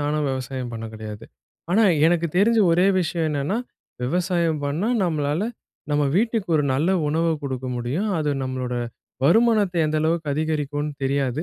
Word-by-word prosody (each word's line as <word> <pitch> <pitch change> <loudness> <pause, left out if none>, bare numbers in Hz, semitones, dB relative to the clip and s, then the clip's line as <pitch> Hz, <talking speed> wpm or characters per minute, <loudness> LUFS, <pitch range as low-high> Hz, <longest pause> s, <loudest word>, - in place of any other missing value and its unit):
நானும் 150 +1 0
விவசாயம் 130 -1 -4
பண்ண 115 0 -5
கெடையாது. 110 0 -8 0.5
ஆனா, 220 +5 +4 0.2
எனக்கு 170 0 +2
தெரிஞ்ச 225 +5 +4
ஒரே 180 +3 +4
விஷயம் 165 -1 -1
என்னன்னா, 145 +8 -1 0.4
விவசாயம் 170 +2 0
பண்ணா 155 +10 -1 0.2
நம்மளால 155 +1 0 0.5
நம்ம 145 0 +2
வீட்டுக்கு 225 -2 0
ஒரு 150 - +2
நல்ல 155 +8 +1 0.2
உணவு 165 +2 +1
குடுக்க 130 -2 -4
முடியும். 135 - -2
அது 150 -1 0
நம்மளோட 130 -1 -3 0.5
வருமானத்த 210 +2 +4
எந்த 155 0 -1
அளவுக்கு 160 -1 0
அதிகரிக்கும்ன்னு 150 -1 -2
தெரியாது. 135 +1 0
150 Hz, 140 wpm, -23 LUFS, 135-175 Hz, 0.5 s, ஆனா